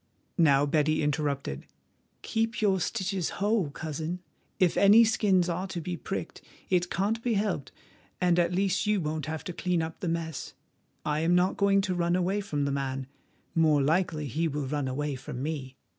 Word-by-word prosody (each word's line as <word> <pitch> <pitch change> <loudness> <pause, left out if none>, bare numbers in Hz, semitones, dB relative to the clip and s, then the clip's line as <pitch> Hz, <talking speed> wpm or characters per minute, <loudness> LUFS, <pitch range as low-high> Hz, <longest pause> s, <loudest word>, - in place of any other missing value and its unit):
Now 145 -4 +5
Betty 155 +1 +2
interrupted: 145 - -2 0.6
"Keep 225 0 -1
your 195 -3 +2
stitches 190 -2 -2
whole, 205 -5 +1
Cousin; 155 +3 -4 0.4
if 180 -3 +3
any 205 +3 +7
skins 200 -5 +3
are 180 +2 -2
to 180 -2 -4
be 175 +2 -4
pricked 195 +3 -5 0.3
it 180 -1 +2
can't 210 +5 0
be 235 -2 0
helped, 195 -10 -1 0.5
and 175 -1 +3
at 170 0 +2
least 195 +2 +1
you 210 -1 +3
won't 155 -2 -3
have 155 0 -4
to 180 - -5
wipe 180 -2 +1
up 160 0 -6
the 180 - -3
mess. 165 -3 -4 0.5
I 150 0 0
am 165 +2 +3
not 180 +1 +3
going 200 0 +3
to 190 -1 -1
run 175 0 +1
away 185 +3 0
from 150 -8 -2
the 140 - 0
man, 135 -1 -2 0.5
more 155 -3 +4
likely 160 0 +1
he 155 +5 -1
will 145 -2 -3
run 145 0 -2
away 145 +3 -2
from 125 0 -6
me. 140 -4 -4
170 Hz, 180 wpm, -28 LUFS, 150-190 Hz, 0.6 s, any